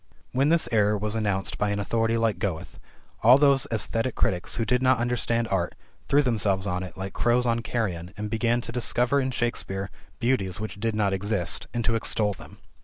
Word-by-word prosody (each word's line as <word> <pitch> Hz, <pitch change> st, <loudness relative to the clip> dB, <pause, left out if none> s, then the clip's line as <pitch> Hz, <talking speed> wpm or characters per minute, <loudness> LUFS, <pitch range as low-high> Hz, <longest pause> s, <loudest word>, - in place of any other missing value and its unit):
When 135 Hz, +3 st, +2 dB
this 170 Hz, 0 st, +3 dB
error 105 Hz, -2 st, +3 dB
was 105 Hz, +1 st, -2 dB
announced 100 Hz, -3 st, -1 dB
by 105 Hz, -, +1 dB
an 100 Hz, -, -1 dB
authority 115 Hz, +2 st, 0 dB
like 115 Hz, -2 st, 0 dB
Goethe, 95 Hz, -7 st, -4 dB, 0.4 s
all 120 Hz, +4 st, +7 dB
those 140 Hz, -2 st, +3 dB
esthetic 115 Hz, +3 st, -1 dB
critics 90 Hz, -1 st, 0 dB
who 115 Hz, -, -1 dB
did 125 Hz, +3 st, +1 dB
not 130 Hz, 0 st, +4 dB
understand 120 Hz, -1 st, 0 dB
art 85 Hz, -3 st, -1 dB, 0.3 s
threw 145 Hz, +1 st, +4 dB
themselves 105 Hz, -6 st, 0 dB
on 90 Hz, -2 st, -1 dB
it 90 Hz, -2 st, -8 dB
like 95 Hz, 0 st, -5 dB
crows 120 Hz, +1 st, +2 dB
on 115 Hz, -1 st, +1 dB
carrion 95 Hz, -8 st, -3 dB
and 105 Hz, 0 st, -3 dB
began 115 Hz, +2 st, 0 dB
to 115 Hz, -, -6 dB
discover 125 Hz, +3 st, +2 dB
in 130 Hz, -, -1 dB
Shakespeare 100 Hz, -5 st, -2 dB, 0.3 s
beauties 115 Hz, -7 st, 0 dB
which 105 Hz, -2 st, -6 dB
did 115 Hz, 0 st, -1 dB
not 100 Hz, -2 st, +1 dB
exist, 95 Hz, -3 st, -1 dB
and 120 Hz, -2 st, -2 dB
to 115 Hz, -, +2 dB
extol 110 Hz, -2 st, 0 dB
them. -, -, -13 dB
115 Hz, 195 wpm, -26 LUFS, 100-120 Hz, 0.4 s, all